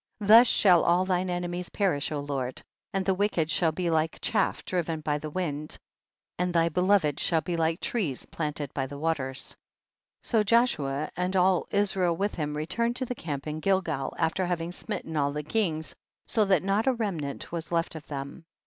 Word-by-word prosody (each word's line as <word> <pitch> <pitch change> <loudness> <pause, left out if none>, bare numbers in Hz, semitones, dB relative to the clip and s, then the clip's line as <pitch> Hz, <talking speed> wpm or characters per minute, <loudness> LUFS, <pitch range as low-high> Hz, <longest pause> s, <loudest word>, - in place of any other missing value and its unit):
22. 210 0 +3
Tiius 235 +2 +10
shall 180 -7 +5
all 175 +2 +3
thine 185 0 0
enemies 175 0 -3
perish 180 -10 0
O 150 - -2
Lord, 135 -3 -4 0.3
and 195 -1 -1
the 195 - +3
wicked 185 -5 0
shall 160 0 +2
be 170 +1 -1
like 160 0 +1
chaff - - 0
driven 170 -3 -1
by 150 -1 -1
the 155 - -5
wind, 150 -3 -3 0.6
and 180 0 +1
thy 165 -1 +3
beloved 180 -3 +2
shall 165 -2 +2
be 175 0 -3
like 165 +1 +1
trees 175 - -2
plant 150 -2 -4
ed 145 -2 -5
by 135 -2 -2
the 140 +1 -8
waters. 140 -4 -2 0.7
23. - - -8
So - - +4
Joshua 155 - +1
and 180 +2 -1
all 185 -1 +3
Israel 190 -4 +1
with 205 +3 -1
him 150 -2 -3
returned 235 +10 -1
to 255 - -1
the 250 - -3
camp 145 - -5
in 155 0 -4
Gilgal, 165 -7 0
after 175 +3 0
having 170 -1 -2
smitten 165 -2 -5
all 145 -1 +1
the 150 +1 -4
kings, 160 -4 -1 0.3
so 215 -2 +2
that 190 -4 +3
not 200 +5 +1
a 265 - +5
remnant 175 - -4
was 170 -1 -5
left 165 -1 0
of 160 -2 -9
them. 140 +3 -6
170 Hz, 195 wpm, -28 LUFS, 150-190 Hz, 0.7 s, Tiius